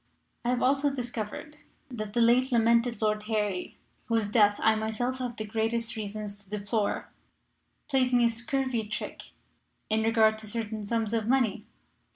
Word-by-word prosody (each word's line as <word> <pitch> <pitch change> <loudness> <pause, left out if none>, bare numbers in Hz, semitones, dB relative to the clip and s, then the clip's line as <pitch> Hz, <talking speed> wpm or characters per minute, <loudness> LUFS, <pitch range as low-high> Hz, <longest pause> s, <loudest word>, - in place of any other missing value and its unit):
"I 240 - 0
have 250 0 +1
also 275 +2 +3
discovered 245 +3 -5 0.3
that 215 -4 -5
the 235 - +2
late 250 +3 +4
lamented 235 0 +3
Lord 215 0 +1
Harry, 210 -4 -1 0.3
whose 225 -2 0
death 205 -2 +4
I 220 - +6
myself 220 +4 -2
have 245 -2 -3
the 215 - -4
greatest 225 +2 -1
reasons 210 -1 -5
to 195 - -16
deplore, 210 +1 -2 0.8
played 260 -3 +2
me 245 -1 +4
a - - +4
scurvy 235 -1 -1
trick 215 - -6 0.6
in 220 0 +3
regard 220 -1 +3
to 220 - -8
certain 215 -1 -4
sums 225 -1 0
of 225 -2 0
money. 230 -4 +1
225 Hz, 160 wpm, -28 LUFS, 215-245 Hz, 0.8 s, I